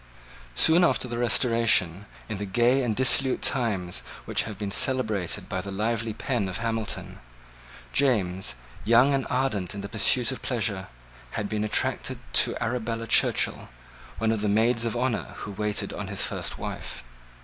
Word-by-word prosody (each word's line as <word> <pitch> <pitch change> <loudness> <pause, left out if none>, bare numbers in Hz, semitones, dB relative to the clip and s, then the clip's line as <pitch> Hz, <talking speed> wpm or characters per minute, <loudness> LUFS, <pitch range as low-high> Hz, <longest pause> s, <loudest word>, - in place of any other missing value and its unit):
Soon 165 - +5
after 165 - +3
the 120 -1 -4
Restoration, 115 -6 +2 0.2
in 105 -4 -5
the 105 - -3
gay 120 +7 +3
and 115 -4 0
dissolute 130 +1 +2
times 100 -9 +1 0.3
which - - 0
have 105 - -7
been 100 -1 -4
celebrated 110 - +1
by - - -3
the 100 - -7
lively 110 +3 -1
pen 110 -2 -2
of 90 - -3
Hamilton, 115 -2 -3 0.7
James, 95 - +1 0.3
young 120 +6 +5
and 135 -1 0
ardent 110 -9 -1
in 100 - -5
the 100 - -5
pursuit - - +3
of - - -6
pleasure, - - -2 0.5
had 105 - -1
been 105 0 -2
attracted 105 0 -1 0.2
to - - +3
Arabella 115 -1 -2
Churchill, - - +1 0.5
one 110 0 +1
of 110 -2 -1
the 105 - 0
maids 115 +3 +2
of 115 +1 -2
honour 125 -2 -2
who 100 - -5
waited 105 +1 -2
on - - -5
his - - -1
first - - -3
wife. - - -6
115 Hz, 160 wpm, -26 LUFS, 100-120 Hz, 0.7 s, Soon